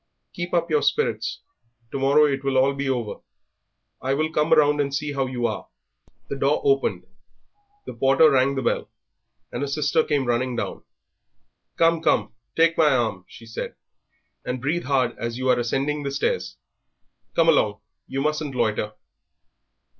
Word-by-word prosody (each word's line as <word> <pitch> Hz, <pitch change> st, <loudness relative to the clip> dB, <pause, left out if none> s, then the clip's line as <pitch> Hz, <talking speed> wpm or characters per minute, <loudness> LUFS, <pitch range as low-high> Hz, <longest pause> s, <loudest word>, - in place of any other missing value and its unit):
"Keep 175 Hz, 0 st, -5 dB
up 170 Hz, -1 st, 0 dB
your 150 Hz, -1 st, +3 dB
spirits; 450 Hz, -, 0 dB, 0.5 s
to 140 Hz, -, -3 dB
morrow 140 Hz, +3 st, +5 dB
it 140 Hz, -2 st, -1 dB
will 135 Hz, 0 st, +2 dB
be 140 Hz, 0 st, -3 dB
all 130 Hz, -2 st, +1 dB
over. -, -, -10 dB, 0.8 s
I 135 Hz, +1 st, 0 dB
will 155 Hz, +2 st, 0 dB
come 150 Hz, +2 st, +1 dB
round 150 Hz, -2 st, +5 dB
and 140 Hz, -1 st, -1 dB
see 145 Hz, +1 st, -2 dB
how 135 Hz, -1 st, -1 dB
you 125 Hz, -2 st, -2 dB
are." -, -, -3 dB, 0.6 s
The 140 Hz, -, -4 dB
door 140 Hz, +2 st, +2 dB
opened. 135 Hz, -1 st, +1 dB, 0.8 s
The -, -, -7 dB
porter 135 Hz, +4 st, +4 dB
rang 135 Hz, +1 st, +3 dB
the 135 Hz, -, -2 dB
bell, -, -, -1 dB, 0.6 s
and -, -, -4 dB
a 145 Hz, -, -1 dB
sister 150 Hz, +2 st, +1 dB
came 145 Hz, -3 st, 0 dB
running 120 Hz, +1 st, 0 dB
down. -, -, -4 dB, 1.0 s
"Come, 165 Hz, 0 st, +3 dB
come, 135 Hz, -, +1 dB, 0.2 s
take 165 Hz, 0 st, +3 dB
my 155 Hz, -2 st, +6 dB
arm," 115 Hz, -8 st, 0 dB
she 115 Hz, -, -14 dB
said, 115 Hz, -, -6 dB, 0.7 s
"and 125 Hz, 0 st, -3 dB
breathe 155 Hz, +7 st, -1 dB
hard 130 Hz, -3 st, +1 dB
as 115 Hz, 0 st, -3 dB
you 130 Hz, 0 st, -2 dB
are 125 Hz, -1 st, +4 dB
ascending 135 Hz, +5 st, -1 dB
the 140 Hz, -, -3 dB
stairs. 465 Hz, -, -2 dB, 0.8 s
Come -, -, +3 dB
along, -, -, +3 dB, 0.3 s
you 135 Hz, -, -3 dB
mustn't 150 Hz, -2 st, -1 dB
loiter." 110 Hz, -3 st, 0 dB
140 Hz, 165 wpm, -24 LUFS, 130-150 Hz, 1.0 s, my